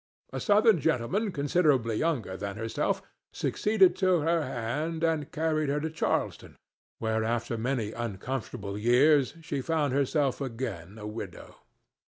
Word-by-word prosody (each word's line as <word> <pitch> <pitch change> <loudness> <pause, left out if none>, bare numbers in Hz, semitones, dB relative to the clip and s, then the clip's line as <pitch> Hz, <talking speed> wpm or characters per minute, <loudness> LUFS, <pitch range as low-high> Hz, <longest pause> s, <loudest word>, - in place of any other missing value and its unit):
A - - -2
Southern 210 -2 +4
gentleman 160 - 0
considerably 140 -6 +2
younger 140 - -1
than 100 0 -5
herself 115 0 -1 0.3
succeeded 210 -4 +3
to 185 -3 +3
her 165 +2 +2
hand 150 +6 -3
and 160 -2 0
carried 155 -2 0
her 145 +1 +1
to 160 +1 -3
Charleston, 160 - -2 0.4
where 110 0 0
after 115 +1 -1
many 115 -2 -1
uncomfortable 110 -2 -4
years 135 +6 +4
she 145 -4 -3
found 150 -2 0
herself 140 0 +1
again 115 - -5
a 105 - -8
widow. 105 +2 -7
140 Hz, 135 wpm, -28 LUFS, 115-160 Hz, 0.4 s, Southern